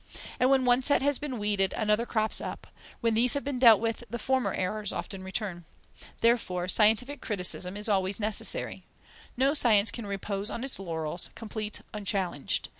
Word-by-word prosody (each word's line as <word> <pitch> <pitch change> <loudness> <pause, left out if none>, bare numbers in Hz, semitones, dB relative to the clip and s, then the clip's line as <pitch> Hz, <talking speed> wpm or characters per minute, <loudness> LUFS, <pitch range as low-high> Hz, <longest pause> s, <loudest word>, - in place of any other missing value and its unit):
And 255 - +3
when 265 -1 +3
one 245 +1 +4
set 275 0 +2
has 285 -1 +1
been 280 -4 -5
weeded, 205 -2 0
another 215 +2 0
crops 220 -1 +1
up; - - -7 0.4
when 230 -2 +1
these 235 +4 +4
have 285 - -2
been 275 -3 -3
dealt 230 -4 +7
with, 230 +1 -3
the 235 - -4
former 260 +2 0
errors 210 +2 -2
often 195 -2 -6
return. 190 -2 -4 0.6
Therefore 195 -7 +1
scientific 225 +8 +2
criticism 180 -2 0
is 210 - -4
always 195 -1 0
necessary. 210 0 -2 0.5
No 270 +3 +2
science 225 -7 +4
can 230 -4 -7
repose 200 +1 -4
on 235 - -5
its 270 -5 -2
laurels, 165 -2 +1
complete, 215 -1 -5
unchallenged. 195 -7 -2
215 Hz, 170 wpm, -28 LUFS, 195-245 Hz, 0.6 s, dealt